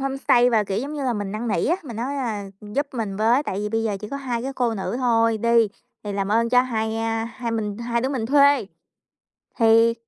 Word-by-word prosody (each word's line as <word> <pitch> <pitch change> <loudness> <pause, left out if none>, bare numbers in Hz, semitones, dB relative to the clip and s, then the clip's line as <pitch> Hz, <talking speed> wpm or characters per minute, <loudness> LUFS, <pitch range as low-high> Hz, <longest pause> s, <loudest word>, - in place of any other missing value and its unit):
homestay 270 -2 +2
và, 220 -3 +3
kiểu, 195 +1 -2
giống 280 +5 -4
như 285 -2 -3
là, 250 - +1
mình 205 -3 -4
năn 225 +2 -3
nỉ 205 - 0
á, 340 - +2
mình 235 -7 -8
nói, 265 +5 -3
à, 225 -6 -3 0.2
giúp 215 +8 -2
mình 210 -5 -3
với, 230 +6 +3
tại 190 - -4
vì 210 +1 -2
bây 225 +1 -1
giờ 210 -3 -1
chỉ 210 - -7
có 280 - -4
2 245 -4 -3
cái 270 +2 -4
cô 240 -3 0
nữ 205 +4 -3
thôi 230 -3 +2
đi 235 0 +3 0.4
thì 205 - -4
làm 195 -1 -2
ơn 230 +2 +2
cho 250 +1 +5
hai, 220 -3 -2
a, 225 0 -1
hai 235 0 -5
mình 210 -2 -3
hai 235 0 -1
đứa 260 - -1
mình 255 -5 -2
thuê, 280 -3 +4 0.9
thì 230 0 +5
230 Hz, 245 wpm, -23 LUFS, 220-255 Hz, 0.9 s, cho